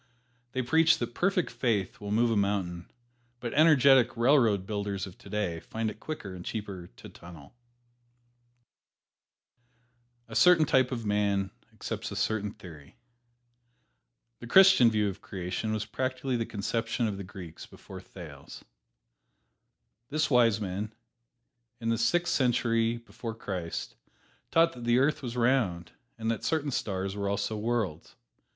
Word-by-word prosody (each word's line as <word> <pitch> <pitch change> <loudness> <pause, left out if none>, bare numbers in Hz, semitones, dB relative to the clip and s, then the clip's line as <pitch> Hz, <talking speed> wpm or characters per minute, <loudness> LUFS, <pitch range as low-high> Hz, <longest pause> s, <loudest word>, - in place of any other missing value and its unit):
They 130 - -1
preach 160 +6 +4
that 120 0 -4
perfect 180 +2 0
faith 105 -7 -1
will 100 - -6
move 115 +3 +2
a - - +1
mountain, 95 -4 -1 0.5
but 120 -2 -5
energetic 140 -6 +5
railroad 115 -6 +3
builders 100 -2 -3
of 95 -2 -11
today 100 -6 -3
find 110 +5 -3
it 110 - -14
quicker 110 -11 -6
and 90 -1 -8
cheaper 100 -5 -6
to - - -12
tunnel. 85 -5 -13 2.7
A 115 - -9
certain 175 +1 +6
type 130 -2 +3
of 115 -3 -4
man 100 -2 0 0.2
accepts - - -5
a - - -5
certain 105 -2 -1
theory. 80 -9 -13 1.4
The 120 - -9
Christian 190 -5 +7
view 105 -2 +1
of 100 0 -5
creation 95 +3 -4
was 110 0 -2
practically 130 +3 -2
the 115 -1 -2
conception 115 +3 -2
of 100 -2 -3
the 100 - -6
Greeks 90 -4 -10
before - - -11
Thales. - - -11 1.4
This 155 +1 0
wise 115 -4 +4
man, 100 +1 -4 0.9
in 115 -1 -2
the 115 - +1
Sixth 175 +9 +2
Century 115 -2 +1
before 115 -1 -8
Christ, 90 -6 -5 0.6
taught 165 +1 +4
that 120 - -10
the 120 +1 +3
earth 140 +4 +2
was 125 -2 -5
round, 115 -9 +1 0.3
and 115 0 -1
that 115 - -4
certain 150 -3 0
stars 95 -4 -2
were 100 -1 -2
also 100 +2 -1
worlds. 105 -7 -2
110 Hz, 140 wpm, -29 LUFS, 100-125 Hz, 2.7 s, Christian